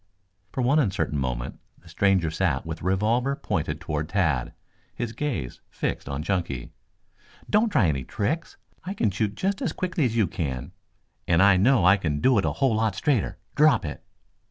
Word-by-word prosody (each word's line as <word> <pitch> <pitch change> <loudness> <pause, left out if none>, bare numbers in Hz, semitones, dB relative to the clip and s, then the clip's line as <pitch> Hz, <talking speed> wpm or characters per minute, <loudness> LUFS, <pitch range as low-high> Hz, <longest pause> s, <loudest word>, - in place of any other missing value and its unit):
For 130 - -2
one 140 +5 +4
uncertain 95 - 0
moment 60 -2 -3 0.2
the - - -22
stranger 95 -5 +2
sat 80 -5 0
with 80 0 -6
revolver 110 +9 +1
pointed 80 - -2
toward 75 -4 -3
Tad, 80 -11 +1 0.4
his 115 -1 -3
gaze 130 - -3
fixed - - -3
on 70 +2 -3
Chunky. 85 -9 -2 0.8
"Don't 215 +2 +3
try 185 - +3
any 70 -5 0
tricks. 120 - -3 0.3
I 190 +4 -5
can 110 - +1
shoot 105 +1 -1
just 195 +1 -1
as - - -1
quickly 180 -5 -1
as 115 -2 -1
you 110 - +4
can, 70 -7 -4 0.6
and 85 -1 +3
I 100 +1 +6
know 110 +2 +4
I 95 +2 +7
can 75 -6 -2
do 125 - +4
it - - 0
a - - +1
whole 135 -4 +1
lot 110 -2 +1
straighter. 135 -2 0 0.2
Drop 150 - +4
it!" 75 - -6
100 Hz, 180 wpm, -25 LUFS, 80-125 Hz, 0.8 s, I